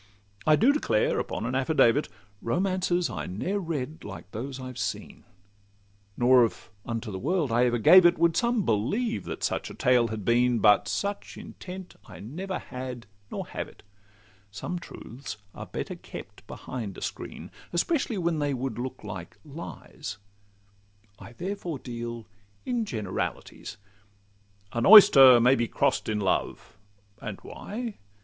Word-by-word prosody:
I 155 - +7
do 245 - +4
declare, 200 - +1
upon 110 - -3
an 125 - -2
affidavit, 135 0 +3 0.3
Romances 180 +4 0
I - - -5
ne'er 180 - -2
read 155 -4 -4
like 100 -1 -9
those 130 +4 -5
I 130 - -7
have 130 -1 -8
seen; 105 -3 -5 0.9
Nor, 125 0 +6
if 115 - -3
unto 115 -1 -4
the 95 - -5
world 155 - 0
I 120 +2 +4
ever 120 -1 +1
gave 180 - +8
it, 175 - +2
Would 170 0 +3
some 235 -3 +1
believe 200 - 0
that - - -6
such - - -1
a - - -9
tale 125 -4 +3
had 110 -3 -5
been: 120 +1 +3
But 105 -2 +5
such 200 0 -3
intent 185 0 -9
I - - -11
never 180 - -5
had, 125 -2 -7 0.2
nor - - -4
have - - -4
it; - - -18 0.7
Some 105 - -5
truths 130 -7 -9 0.2
are - - -8
better - - -5
kept - - -11
behind 110 -7 -6
a - - -9
screen, - - -6 0.2
Especially 235 - 0
when 170 -3 0
they 145 -2 0
would 130 -1 -4
look 130 +1 -5
like 95 -5 -8
lies; 140 -7 -8 1.0
I 115 - -11
therefore 180 0 -4
deal 120 -2 -6 0.4
in 240 -3 -1
generalities. 110 - -4 1.0
'An 115 0 +1
oyster 135 - +10
may 125 +3 +5
be 120 -3 +1
cross'd - - 0
in 105 -1 0
love,'—and 100 +1 -4
why? 225 0 -6
130 Hz, 150 wpm, -27 LUFS, 115-175 Hz, 1.0 s, oyster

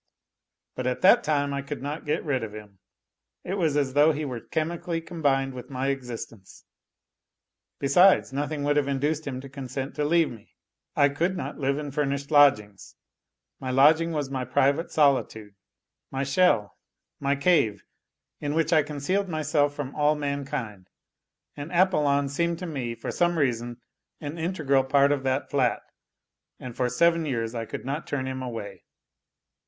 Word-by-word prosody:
But 130 0 -3
at 125 - -2
that 235 +6 +6
time 145 -2 0
I 140 - -2
could 140 0 -7
not 150 +2 -5
get 150 - -1
rid 135 -5 0
of 105 -2 -6
him, 105 -3 -12 0.6
it 185 - -4
was 160 -7 +1
as 135 -3 0
though 145 +3 +5
he 150 +1 -3
were 125 -4 -4
chemically 165 +4 -3
combined 140 -5 -1
with 125 -1 -9
my 135 0 -2
existence. 120 -6 -7 1.1
Besides, 160 +2 +4
nothing 145 +1 -2
would 145 +1 +1
have 145 -2 +2
induced 145 +3 -1
him 130 -2 -4
to 135 - -9
consent 135 0 -6
to 150 - -2
leave 165 +2 +2
me. 115 -3 -14 0.4
I 145 0 +4
could 170 +6 -1
not - - -5
live 140 0 0
in 150 -1 -5
furnished 140 0 -2
lodgings: 110 -9 +3 0.6
my 130 - -5
lodging 155 +6 +4
was 145 -4 -3
my 130 -2 -2
private 140 +6 +1
solitude, 130 -8 +1 0.6
my 135 0 -2
shell, 140 - +2 0.4
my 140 0 +1
CHVC, 140 - +2 0.6
in 145 0 -3
which 165 +1 +1
I 155 - +6
concealed 155 +7 -2
myself 150 -2 0
from 145 -2 -5
all 150 0 +2
mankind, 140 -9 -4 0.7
and 145 +2 -7
Apollon 150 -6 +2
seemed 170 +4 -1
to 180 - -6
me, 130 -8 -4
for - - -5
some 175 -1 +1
reason, 120 -4 -1 0.4
an 150 +2 -6
integral 155 -6 +1
part 140 +1 +3
of 145 -2 0
that 130 +1 -1
flat, 130 -4 +1 0.8
and 125 -2 -8
for 125 -1 0
seven 170 +6 +3
years 115 -4 -2
I 115 -1 -4
could - - -7
not 140 +4 -4
turn 130 -2 -2
him 130 0 -4
away. 110 -6 -6
140 Hz, 165 wpm, -26 LUFS, 130-155 Hz, 1.1 s, that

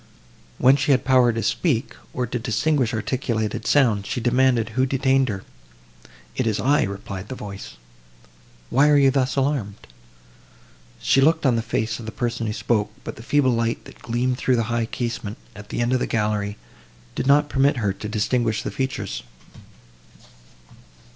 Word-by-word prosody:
When 130 +2 +5
she 145 - -1
had 135 -2 +3
power 130 -2 +5
to 115 0 -3
speak, 130 - 0 0.2
or 125 - -2
to 120 +1 -3
distinguish 125 +3 +1
articulated 110 -1 -2
sounds, 115 -8 +3
she - - -2
demanded 120 -1 +2
who 130 +4 +1
detained 135 0 +2
her. 95 -2 -4 0.9
"It - - 0
is 110 -2 0
I," 145 +3 +3
replied 100 0 -5
the 130 - -5
voice—"Why - - -4
are 150 - +5
you 135 -1 +5
thus 130 -1 0
alarmed?" 135 -7 0 1.2
She 135 - +3
looked 160 +2 +3
on 125 -3 +4
the 115 - +1
face 110 0 -2
of 115 - -8
the - - -4
person 120 0 -2
who 105 - -2
spoke, 105 -1 0
but - - -6
the - - -11
feeble 130 +2 +2
light, 115 -1 -1
that - - -14
gleamed 125 +2 -1
through 130 - +2
the 115 - +1
high 115 -1 0
casement 115 -3 -4 0.2
at 105 0 -11
the - - -2
end 120 +2 +1
of 130 - +2
the - - -1
gallery, 105 -2 -1 0.6
did 130 - -3
not 145 +1 +5
permit 140 -1 +2
her 105 -4 0
to 105 +2 -7
distinguish 110 +1 0
the - - -3
features. 130 0 -3
120 Hz, 170 wpm, -23 LUFS, 105-130 Hz, 1.2 s, When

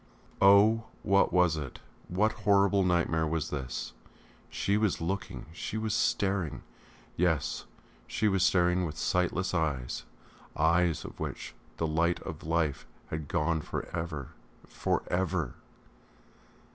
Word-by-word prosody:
Oh! 105 +3 +6 0.2
What 100 -1 +3
was 90 -3 +3
it? 70 -5 -6 0.3
What 105 +5 +2
horrible 100 -1 +3
nightmare 85 -3 +2
was 80 -1 -2
this?... 65 -4 -4 0.6
She 100 - 0
was 105 -3 +1
looking, 95 +4 -3
she 100 - -4
was 110 -1 -1
staring... 95 -6 0 0.5
yes, 80 -5 0 0.4
she 110 - 0
was 95 -2 +2
staring 90 0 +3
with 80 -2 -4
sightless 90 +2 0
eyes 70 -7 -1 0.5
eyes 85 0 +2
out - - -6
of - - -24
which - - -5 0.2
the 80 - 0
light 85 +2 +1
of 80 -1 -7
life 80 -3 0 0.2
had 80 -2 -4
gone 80 0 0
for - - -4
ever! 80 -5 -4 0.4
for - - -1
ever!... 90 -1 0
85 Hz, 130 wpm, -30 LUFS, 80-95 Hz, 0.6 s, Oh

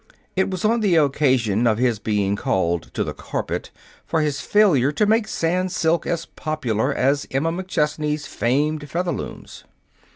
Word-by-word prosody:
It 190 +1 +1
was 185 +1 -3
on 230 +2 +3
the 200 -5 +2
occasion 130 -7 +2
of 110 -2 +2
his 120 -3 +1
being 100 -2 0
called 85 -4 -1
to - - +1
the - - -4
carpet - - -4 0.3
for 160 - 0
his 145 -3 -1
failure 150 - +3
to 150 +8 +1
make 220 +1 +2
Sans 180 +3 -1
silks 165 0 +1
as 170 -1 -1
popular 130 -5 -2
as 140 +1 +1
Emma 145 +5 0
McChesney's 150 -4 -1
famed 145 +4 -1
Featherlooms. 175 +1 -4
150 Hz, 155 wpm, -22 LUFS, 125-175 Hz, 0.3 s, on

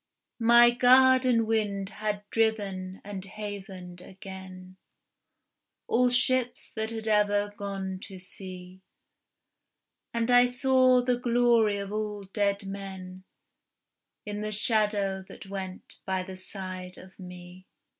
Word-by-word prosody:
My 235 +1 +7
garden 255 -1 +5
wind 205 -3 -1
had 210 -1 -4
driven 200 -4 -1
and 200 -2 -6
havened 195 -3 -8
again 185 -1 -11 1.1
All 250 +1 +3
ships 245 0 +1
that 220 0 -2
ever 210 -2 +1
had 205 - -21
gone 195 -2 -4
to 190 - -10
sea, 185 0 -11 1.3
And 230 +1 0
I 245 0 +7
saw 255 0 +3
the 250 -1 +1
glory 235 -3 +3
of 200 0 -5
all 210 -1 -3
dead 200 +1 -1
men 190 -1 -8 1.0
In 210 0 -4
the 215 0 -3
shadow 205 -3 +2
that - - -11
went 190 -1 -7
by 190 -1 -2
the 190 0 -8
side 185 -1 -7
of 185 +1 -15
me. 180 0 -11
205 Hz, 115 wpm, -28 LUFS, 190-230 Hz, 1.3 s, My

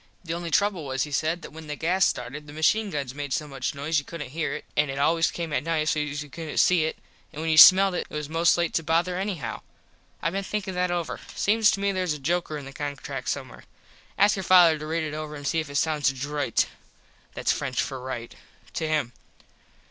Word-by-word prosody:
The 165 -2 -4
only 170 0 -4
trouble 190 +1 +1
was, 135 -1 -1
he 150 - -6
said, 160 +4 -1
that - - -9
when 160 0 -10
the 150 - -4
gas 180 +5 +2
started 150 +4 -5
the 145 - -10
machine 205 +8 +2
guns 140 -6 -4
made 145 -1 -5
so 150 - -2
much 135 0 -4
noise 150 +3 0
you - - -7
couldnt 150 -3 -7
hear 160 +2 -2
it - - -8
an 150 -1 +2
it 135 - -4
always 165 +3 +3
came 165 -3 -5
at - - +1
night 160 -1 0
sos 150 -1 -1
you - - -12
couldnt 160 0 -6
see 175 -3 +4
it 160 - -3 0.3
and 150 - -9
when 160 0 0
you 155 - +2
smelled 190 +3 +9
it - - -3
it - - -9
was 150 -1 -3
most 165 +2 +3
to 175 - +1
late 170 - -1
to - - +1
bother 170 +3 +1
anyhow. 190 - -4 0.6
I 165 - -1
been 195 +2 -2
thinkin 195 -1 -3
that 180 0 0
over. 175 -2 -2 0.2
Seems 215 +1 +3
to 200 - -2
me 200 0 +1
theres 185 -4 -1
a - - -5
joker 155 +2 -1
in 145 - -8
the 135 - -9
contract 145 -1 -5
somewhere. - - -5 0.5
Ask 205 +1 +5
your - - -2
father 175 -4 +6
to 155 - -6
read 165 +1 -1
it 155 -1 -4
over 155 0 -5
an 145 -1 -8
see 160 - +1
if 155 -2 -4
it 140 - -8
sound 145 -3 +1
droit 145 -3 0 0.7
(thats - - +1
French 130 -1 -2
for 135 -2 -2
right) 125 -2 -6 0.4
to 160 - -2
him. 150 -6 0
155 Hz, 240 wpm, -26 LUFS, 145-175 Hz, 0.7 s, smelled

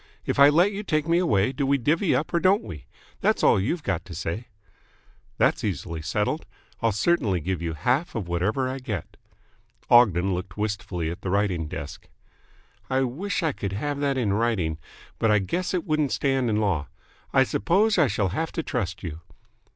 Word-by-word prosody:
If - - -1
I 140 +1 +9
let 175 +7 +4
you 205 0 -4
take 155 -6 -1
me 170 +1 +3
away, 105 - +2
do 140 +2 -3
we 140 +1 +3
divvy 155 - +1
up 155 - -2
or 170 - +3
don't 190 +4 +3
we? 75 -7 -9 0.3
That's - - +1
all - - +5
you've 150 - -1
got 90 -4 -1
to 85 - -9
say." 105 +9 -4 0.9
"That's - - +2
easily 85 -4 -3
settled. 105 - -1 0.3
I'll 115 - +2
certainly 105 - +1
give 90 +2 -3
you 85 -1 -2
half 125 - 0
of 105 -6 -3
whatever 100 +10 0
I 130 +1 -4
get." 110 - -5 0.8
Ogden 100 -6 +5
looked 90 +1 -5
wistfully 100 -6 -2
at 90 +4 -8
the 95 - -4
writing 95 -5 0
desk. 75 +1 -8 0.8
"I 130 0 +2
wish 165 +11 -2
I 160 - +2
could 100 -7 -5
have 145 +7 -2
that 140 -2 0
in 110 -6 +1
writing. 100 -8 0 0.4
But 115 - +2
I 105 - +5
guess 170 - -2
it 180 0 -1
wouldn't 155 -4 +1
stand 135 -3 +1
in 105 - +1
law. 95 -9 0 0.4
I - - +5
suppose 200 - +2
I 155 - +5
shall 100 -5 0
have 160 - -2
to 165 - -2
trust 95 - -3
you." 80 -2 -6
110 Hz, 190 wpm, -25 LUFS, 90-145 Hz, 0.9 s, I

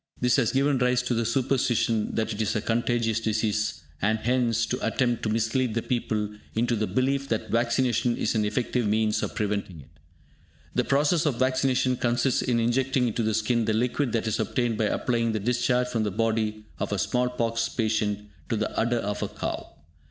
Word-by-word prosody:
This 125 0 +3
has 125 -5 +2
given 135 0 +2
rise 125 0 +2
to 125 - -1
the 115 -1 0
superstition 120 -3 +1
that 110 0 -1
it 105 - -3
is 110 +1 0
a 110 - 0
contagious 115 0 0
disease, 110 -3 -1 0.2
and 110 +3 +2
hence 115 -1 +1
to 125 - -2
the - - -2
attempt 120 -3 0
to 110 - -1
mislead 115 +2 0
the 115 - 0
people 110 -4 -1 0.3
into 120 +1 +1
the 110 -1 -1
belief 135 +2 0
that 110 - -2
vaccination 120 +1 +1
is - - 0
an 110 -2 +1
effective 120 +2 0
means 110 0 +1
of - - -4
preventing 100 -5 -2
it. 70 +1 -17 0.7
The - - +1
process 150 +3 +2
of 135 -5 0
vaccination 130 0 +1
consists 120 +2 +1
in 120 -2 +1
injecting 125 +2 +1
into 115 +2 -2
the 110 -1 +1
skin 115 +1 +1
the 110 - +1
liquid 125 +3 0
that 115 - 0
is 110 - -1
obtained 120 -3 0
by 110 - +2
applying 115 +1 0
the 110 - -1
discharge 125 +3 +1
from 115 -2 -1
the 105 - 0
body 110 0 -1
of - - -2
a 100 - 0
small 125 +5 +1
pox 115 -2 -1
patient 105 -2 -1 0.2
to 115 - +1
the 110 0 -2
udder 120 +1 +1
of 105 -2 -3
a - - -1
cow. - - -5
115 Hz, 200 wpm, -26 LUFS, 110-125 Hz, 0.7 s, This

